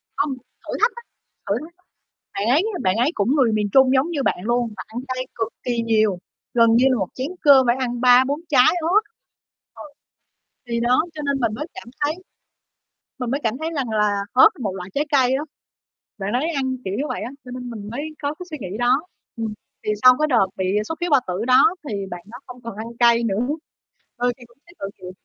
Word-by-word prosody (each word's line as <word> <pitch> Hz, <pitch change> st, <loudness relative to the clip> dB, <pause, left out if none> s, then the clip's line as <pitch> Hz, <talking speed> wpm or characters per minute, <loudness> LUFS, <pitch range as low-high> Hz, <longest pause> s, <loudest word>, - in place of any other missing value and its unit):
không 285 Hz, -1 st, 0 dB
thử 255 Hz, -, -11 dB
thách 450 Hz, -, +4 dB
á, 475 Hz, -, -9 dB, 0.5 s
thử -, -, +1 dB
thách, 335 Hz, +2 st, -13 dB, 0.6 s
bạn 200 Hz, +2 st, -2 dB
ấy, 290 Hz, +8 st, +4 dB
a, -, -, -4 dB
bạn 185 Hz, +1 st, +2 dB
ấy 250 Hz, +6 st, +2 dB
cũng 235 Hz, -, +1 dB
người 255 Hz, -6 st, +3 dB
miền 210 Hz, -1 st, +1 dB
Trung 265 Hz, -1 st, +6 dB
giống 270 Hz, +5 st, +2 dB
như 285 Hz, -5 st, -1 dB
bạn -, -, +1 dB
luôn, 240 Hz, +2 st, +1 dB
và 185 Hz, -, -5 dB
ăn 225 Hz, +2 st, -6 dB
cay 255 Hz, 0 st, -2 dB
cực 225 Hz, -, -1 dB, 0.2 s
kỳ 240 Hz, -2 st, -1 dB
nhiều, 215 Hz, -4 st, +2 dB, 0.3 s
gần 230 Hz, -1 st, +5 dB
như 245 Hz, +3 st, +5 dB
là 255 Hz, -, +2 dB
một 190 Hz, -4 st, -1 dB
chén 260 Hz, +1 st, -3 dB
cơm 275 Hz, -4 st, +7 dB
phải 240 Hz, -, +4 dB
ăn 245 Hz, -1 st, -2 dB
3,4 255 Hz, +3 st, +5 dB
trái 255 Hz, -4 st, +6 dB
ớt. 365 Hz, +7 st, +3 dB, 1.4 s
Ừ, -, -, -36 dB
thì 235 Hz, 0 st, -1 dB
đó, 245 Hz, +2 st, +3 dB
cho 305 Hz, -, -6 dB
nên 280 Hz, -2 st, -1 dB
mình 225 Hz, -3 st, 0 dB
mới 300 Hz, -, -4 dB
cảm 380 Hz, -10 st, -10 dB
thấy 295 Hz, +1 st, +1 dB, 1.1 s
mình 250 Hz, -1 st, -2 dB
mới 280 Hz, -, 0 dB
cảm 225 Hz, +1 st, 0 dB
thấy 315 Hz, +3 st, -3 dB
rằng 265 Hz, -5 st, -2 dB
là 210 Hz, -2 st, +1 dB, 0.2 s
ớt 255 Hz, -, +8 dB
một 200 Hz, -5 st, -2 dB
loại 180 Hz, -1 st, -7 dB
trái 290 Hz, -, 0 dB
cây 260 Hz, -3 st, +4 dB
á, 280 Hz, -, -2 dB, 0.8 s
bạn 195 Hz, +1 st, -3 dB
đấy 280 Hz, +7 st, 0 dB
ăn 260 Hz, -1 st, -1 dB
kiểu 190 Hz, -, -3 dB
như 265 Hz, -, -1 dB
vậy -, -, -3 dB
á, 240 Hz, -, -5 dB
cho 250 Hz, -, -10 dB
nên 250 Hz, -1 st, -6 dB
mình 210 Hz, -3 st, -7 dB
mới 240 Hz, -, -4 dB, 0.2 s
có 285 Hz, +1 st, -1 dB
cái 360 Hz, -, -10 dB
suy 305 Hz, -, -5 dB
nghĩ 195 Hz, -1 st, -5 dB
đó 245 Hz, +3 st, +3 dB, 0.4 s
ừm, 225 Hz, -2 st, -3 dB, 0.3 s
thì 215 Hz, -, 0 dB
sau 255 Hz, 0 st, +9 dB
cái 305 Hz, -, +2 dB
đợt 235 Hz, -8 st, +4 dB
bị 190 Hz, -, -2 dB, 0.2 s
xuất 325 Hz, -, -4 dB
huyết 350 Hz, 0 st, -1 dB
bao 280 Hz, -3 st, +5 dB
tử 185 Hz, +4 st, -2 dB
đó 255 Hz, +7 st, +5 dB
thì 215 Hz, -, -3 dB, 0.2 s
bạn 175 Hz, 0 st, -7 dB
đó 235 Hz, -, -9 dB
không 250 Hz, -1 st, -11 dB
còn 230 Hz, -3 st, -7 dB
ăn 220 Hz, -, -5 dB
cay 235 Hz, -1 st, +5 dB
nữa, 220 Hz, +2 st, 0 dB, 0.7 s
ừ, 245 Hz, 0 st, +1 dB
thì 245 Hz, -, -14 dB
cũng 235 Hz, -, -26 dB
thấy 345 Hz, -, -18 dB
tội 195 Hz, -, -4 dB
nghiệp 180 Hz, -1 st, -9 dB
245 Hz, 235 wpm, -22 LUFS, 225-275 Hz, 1.4 s, sau